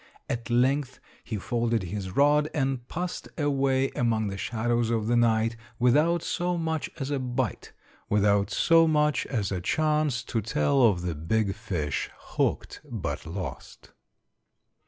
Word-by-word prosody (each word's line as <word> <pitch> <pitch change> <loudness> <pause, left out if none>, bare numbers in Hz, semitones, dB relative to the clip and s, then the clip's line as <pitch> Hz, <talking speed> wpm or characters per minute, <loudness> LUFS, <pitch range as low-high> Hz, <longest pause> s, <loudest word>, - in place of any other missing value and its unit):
At 120 0 -4
length 130 +2 +1 0.2
he 110 - -4
folded 115 +1 0
his 95 +1 -4
rod 150 +2 +4
and 135 -4 -1
passed 180 +1 -4
away 135 -3 +1
among 110 -3 0
the 100 - -4
shadows 120 +1 0
of 115 -2 0
the 120 +2 +2
night, 115 -1 +2 0.2
without 150 +8 +3
so 175 0 -1
much 160 -2 -2
as 135 0 -4
a 140 - 0
bite, 125 -3 -3 0.4
without 100 -1 +3
so 165 +4 +4
much 150 -1 +2
as 105 -7 -2
a 90 -2 -2
chance 150 - +1
to 115 - -2
tell 105 - +1
of 100 -8 +4
the 90 -2 -1
big 100 +7 0
fish 90 -10 -3
'hooked' - - -2
but - - -4
lost. 95 +3 -7
120 Hz, 145 wpm, -27 LUFS, 105-145 Hz, 0.4 s, rod